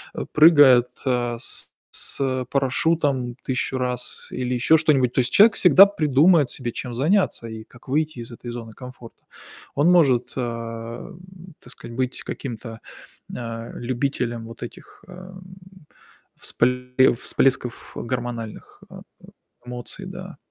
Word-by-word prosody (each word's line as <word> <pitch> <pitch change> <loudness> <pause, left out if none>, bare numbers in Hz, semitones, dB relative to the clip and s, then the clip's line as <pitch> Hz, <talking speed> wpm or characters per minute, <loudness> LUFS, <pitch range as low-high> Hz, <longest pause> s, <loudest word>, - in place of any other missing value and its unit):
э, - - -4
прыгает, 145 -6 +7 0.2
а, 120 -2 0
с - - -5 0.2
с, - - -4
э, 130 -2 -1
парашютом 135 -2 0
1000 130 0 -2
раз 125 -1 -4
или 125 0 -3
ещё 125 +6 +4
что-нибудь. 140 -6 +2
То - - +1
есть 120 - -2
человек 215 +1 +7
всегда 195 +2 +7
придумает 155 -3 +3
себе, 120 -2 -4
чем 120 +1 -6
заняться 150 - +1
и 110 -1 -8
как 125 +3 -20
выйти 155 0 -1
из 120 +1 -8
этой 120 +1 -8
зоны 115 -2 -8
комфорта. 125 -2 -12 0.5
Он 145 +5 +3
может, 135 -9 +3
э, - - -4
м, 120 +10 -7
так - - -14
сказать, 115 - -11
быть 130 -1 -2
каким-то, 115 -3 -7 0.5
а, 115 -1 -6
любителем 120 -2 -3
вот 115 0 -12
этих, 120 - -12
э, - - -14
м, 185 +1 -11 0.9
вспле 125 +1 +2
всплесков, 125 0 0
э, - - -3
гормональных, 120 -2 -6
э - - -10 0.2
э, - - -15 0.4
эмоций, 125 0 -7
да, - - -9
125 Hz, 145 wpm, -23 LUFS, 120-150 Hz, 0.9 s, прыгает